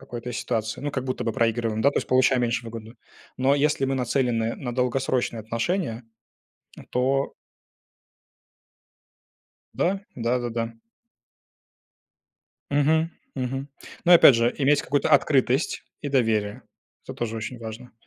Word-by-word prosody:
какой-то 125 Hz, -2 st, -7 dB
ситуации, 110 Hz, -1 st, -2 dB
ну, 145 Hz, +1 st, -3 dB
как 130 Hz, -2 st, -3 dB
будто 130 Hz, -1 st, -3 dB
бы 115 Hz, -, -1 dB
проигрываем, 115 Hz, -1 st, 0 dB
да, 140 Hz, -, +5 dB
то -, -, 0 dB
есть -, -, -5 dB
получаем 130 Hz, -1 st, +3 dB
меньше 120 Hz, +1 st, -1 dB
выгоды. 115 Hz, 0 st, -8 dB, 0.4 s
Но 135 Hz, +2 st, +3 dB
если 145 Hz, -1 st, +1 dB
мы 135 Hz, 0 st, 0 dB
нацелены 120 Hz, -3 st, 0 dB
на 120 Hz, -3 st, -5 dB
долгосрочные 125 Hz, -2 st, 0 dB
отношения, 115 Hz, -, -2 dB, 0.7 s
н -, -, -13 dB
то 135 Hz, +2 st, 0 dB, 2.4 s
Да! 195 Hz, +2 st, 0 dB, 0.2 s
Да-да-да. 120 Hz, -1 st, -1 dB, 2.0 s
Мгм, 160 Hz, +3 st, +2 dB, 0.2 s
мгм. 135 Hz, +1 st, -3 dB, 0.4 s
Но, 175 Hz, -, +6 dB
опять 165 Hz, -6 st, +9 dB
же, 115 Hz, +1 st, +2 dB
иметь 145 Hz, +1 st, +3 dB
какую-то 145 Hz, +2 st, 0 dB
открытость 135 Hz, -1 st, +2 dB, 0.2 s
и 145 Hz, -, -4 dB
доверие- 110 Hz, -6 st, 0 dB, 0.4 s
это -, -, -8 dB
тоже 115 Hz, -1 st, -3 dB
очень 115 Hz, +3 st, -5 dB
важно. 115 Hz, +2 st, -9 dB
125 Hz, 125 wpm, -25 LUFS, 115-135 Hz, 2.4 s, опять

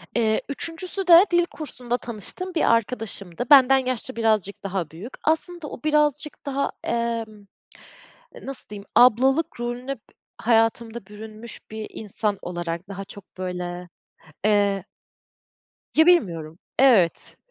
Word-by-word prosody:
Eee, 220 Hz, -2 st, +2 dB
3'üncüsü 345 Hz, +6 st, -3 dB
de 345 Hz, +2 st, +9 dB
dil 345 Hz, 0 st, +4 dB
kursunda 250 Hz, -7 st, -4 dB
tanıştığım 245 Hz, -, -6 dB
bir 320 Hz, -, +3 dB
arkadaşımdı. 225 Hz, -3 st, -2 dB
Benden 270 Hz, -2 st, +8 dB
yaşça 255 Hz, -1 st, -3 dB
birazcık 215 Hz, -4 st, 0 dB
daha 190 Hz, -5 st, -3 dB
büyük. 195 Hz, +11 st, -10 dB
Aslında 325 Hz, +1 st, -1 dB
o -, -, -8 dB
birazcık 300 Hz, -1 st, +1 dB
daha, 280 Hz, 0 st, -1 dB
emm, 230 Hz, -3 st, -3 dB, 1.0 s
nasıl 275 Hz, -1 st, -4 dB
diyeyim, 205 Hz, -1 st, -8 dB
ablalık 260 Hz, +5 st, +4 dB
rolüne 245 Hz, +3 st, -3 dB
b -, -, -25 dB, 0.4 s
hayatımda 225 Hz, -1 st, +1 dB
bürünmüş 215 Hz, +2 st, -10 dB
bir 220 Hz, -1 st, -5 dB
insan 210 Hz, -1 st, -2 dB
olarak 175 Hz, +1 st, -5 dB
daha 195 Hz, 0 st, -6 dB
çok 200 Hz, -1 st, -14 dB
böyle, 180 Hz, -1 st, -5 dB, 0.6 s
eee 200 Hz, -2 st, +2 dB, 1.1 s
ya, 320 Hz, -, +6 dB
bilmiyorum. 170 Hz, -, +2 dB, 0.2 s
Evet. 225 Hz, -11 st, +3 dB
230 Hz, 120 wpm, -24 LUFS, 200-275 Hz, 1.1 s, de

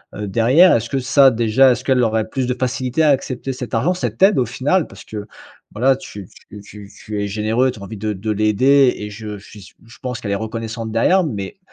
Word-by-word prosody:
heu, 105 Hz, 0 st, -5 dB
derrière? 125 Hz, -, +4 dB
Est-ce 115 Hz, 0 st, -2 dB
que 135 Hz, -, -2 dB
ça 135 Hz, +1 st, +5 dB
déjà, 115 Hz, +3 st, +3 dB
est-ce 125 Hz, +1 st, -2 dB
qu'elle 130 Hz, -2 st, +2 dB
aurait 110 Hz, -1 st, 0 dB
plus 130 Hz, +2 st, -3 dB
de 125 Hz, -, -1 dB
facilité 130 Hz, +4 st, -1 dB
à 150 Hz, -, +4 dB
accepter 135 Hz, -1 st, -1 dB
cet 125 Hz, -2 st, -6 dB
argent, 145 Hz, +11 st, +1 dB
cette 185 Hz, -, -5 dB
aide, 195 Hz, -6 st, +5 dB
au 125 Hz, -, +2 dB
final? 145 Hz, +8 st, 0 dB
Parce 95 Hz, -, -13 dB
que 105 Hz, -1 st, -7 dB, 0.5 s
voilà, 130 Hz, +5 st, +2 dB
tu 100 Hz, -7 st, -10 dB, 0.2 s
tu 105 Hz, 0 st, -11 dB
tu 100 Hz, 0 st, -13 dB, 0.2 s
tu 105 Hz, -1 st, -4 dB
es 100 Hz, -, -2 dB
généreux, 110 Hz, +5 st, 0 dB
tu 120 Hz, -, -12 dB
as -, -, -10 dB
envie 105 Hz, +2 st, -8 dB
de 105 Hz, +1 st, -3 dB
de 105 Hz, +3 st, -4 dB
l'aider 125 Hz, +6 st, +3 dB
et 105 Hz, -, -6 dB
je 105 Hz, 0 st, -8 dB
suis 105 Hz, +1 st, -14 dB
sû -, -, -15 dB
je 120 Hz, -, -16 dB
pense 125 Hz, -1 st, -5 dB
qu'elle 100 Hz, -3 st, -4 dB
est -, -, +1 dB
reconnaissante 110 Hz, +1 st, -5 dB
derrière. 180 Hz, +12 st, +3 dB
Mais, 100 Hz, -, -6 dB
115 Hz, 235 wpm, -19 LUFS, 105-130 Hz, 0.5 s, ça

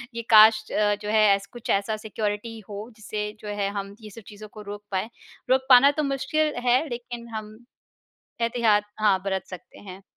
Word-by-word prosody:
ये 235 Hz, -, -3 dB
काश 215 Hz, 0 st, +7 dB
अ, 205 Hz, -1 st, +2 dB
जो 210 Hz, -, -5 dB
है 215 Hz, 0 st, +4 dB
ऐस 200 Hz, 0 st, -7 dB
कुछ 240 Hz, -, -10 dB
ऐसा 200 Hz, +2 st, 0 dB
सिक्योरिटी 215 Hz, +1 st, -4 dB
हो 210 Hz, +3 st, -7 dB
जिससे 210 Hz, -1 st, -5 dB
जो 210 Hz, -, -10 dB
है 205 Hz, -1 st, -2 dB
हम 200 Hz, 0 st, -6 dB
ये 215 Hz, -, -10 dB
सब 225 Hz, +3 st, -12 dB
चीज़ों 215 Hz, 0 st, -11 dB
को 215 Hz, -, -10 dB
रोक 205 Hz, 0 st, -8 dB
पाएँ। 190 Hz, +4 st, -2 dB, 0.4 s
रोक 260 Hz, 0 st, +2 dB
पाना 260 Hz, +2 st, +8 dB
तो -, -, +2 dB
मुश्किल 290 Hz, +3 st, -1 dB
है 255 Hz, +6 st, +3 dB
लेकिन 240 Hz, -1 st, -7 dB
हम 215 Hz, 0 st, -7 dB, 0.8 s
एहतियात 230 Hz, -3 st, +2 dB
हाँ, 205 Hz, -3 st, +3 dB
बरत 190 Hz, -1 st, -2 dB
सकते 185 Hz, -2 st, -11 dB
हैं। 190 Hz, -1 st, -11 dB
215 Hz, 190 wpm, -25 LUFS, 205-235 Hz, 0.8 s, पाना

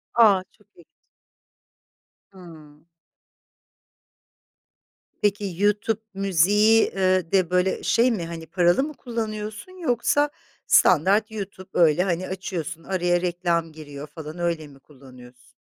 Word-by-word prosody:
A! 205 Hz, -5 st, +5 dB
Çok 210 Hz, -, -29 dB
ilginç. 170 Hz, -, -23 dB, 1.3 s
Hımm. 160 Hz, -5 st, -15 dB, 2.4 s
Peki 200 Hz, -3 st, -1 dB
YouTube 210 Hz, +1 st, +1 dB
Music'i, 200 Hz, +4 st, +3 dB
eee, 185 Hz, -3 st, +1 dB
de, 185 Hz, -3 st, +2 dB
böyle, 180 Hz, +1 st, 0 dB
şey 245 Hz, +2 st, +3 dB
mi, 190 Hz, -7 st, -3 dB
hani, 165 Hz, -1 st, -7 dB
paralı 175 Hz, +7 st, +2 dB
mı 305 Hz, +1 st, -5 dB
kullanıyorsun 220 Hz, +1 st, -6 dB
yoksa 290 Hz, +2 st, +1 dB, 0.4 s
standart 195 Hz, +6 st, +4 dB
YouTube, 195 Hz, -3 st, -7 dB
öyle, 165 Hz, 0 st, +4 dB
hani, 185 Hz, -1 st, -2 dB
açıyorsun, 170 Hz, -3 st, -5 dB
araya 175 Hz, -1 st, 0 dB
reklam 175 Hz, -2 st, -1 dB
giriyor 145 Hz, -2 st, -10 dB
falan, 155 Hz, +2 st, -9 dB
öyle 170 Hz, -3 st, -2 dB
mi 140 Hz, -1 st, -17 dB
kullanıyorsun? 125 Hz, -3 st, -17 dB
185 Hz, 110 wpm, -23 LUFS, 165-210 Hz, 2.4 s, A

